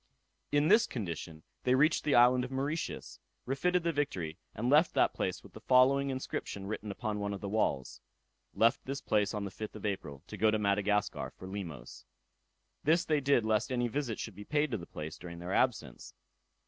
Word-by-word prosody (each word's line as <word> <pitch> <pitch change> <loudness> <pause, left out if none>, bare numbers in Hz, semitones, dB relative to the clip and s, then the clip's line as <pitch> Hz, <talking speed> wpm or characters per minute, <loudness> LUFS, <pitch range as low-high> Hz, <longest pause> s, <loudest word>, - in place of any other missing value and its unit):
In 145 +1 +3
this 220 +6 +5
condition 85 -7 -5 0.2
they 125 0 +3
reached 150 +5 +3
the 145 - +3
island 125 +1 +6
of 125 - -4
Mauritius, 140 +5 -3 0.3
refitted 175 +7 +1
the 170 - +1
Victory, 95 - -2 0.2
and 115 +3 -2
left 150 +5 +4
that - - +3
place - - -3
with - - -15
the - - -11
following 135 +2 +4
inscription 130 -6 -4
written 105 +1 -4
upon 105 +1 -3
one 100 0 -2
of - - -7
the 100 - -4
walls: 100 - -1 0.5
"Left 115 +4 +3
this 135 +1 -4
place 105 -5 +1
on 105 -2 -3
the 100 - -5
5th 110 +3 -7
of 110 - -7
April, 75 -9 -4
to 105 - -8
go 110 +2 +4
to 110 - +2
Madagascar 105 0 0
for 95 - -9
Limos." 95 -7 -7 0.8
This 165 +4 +3
they 150 -2 +2
did 135 -4 +3
lest 110 +3 +1
any 120 -1 +1
visit 120 -2 -2
should 110 - -5
be 105 - -8
paid 150 +5 0
to 115 - 0
the 85 - -9
place 75 +1 -7
during 85 -1 -8
their 90 +2 -5
absence. 110 - -1
110 Hz, 200 wpm, -32 LUFS, 100-135 Hz, 0.8 s, island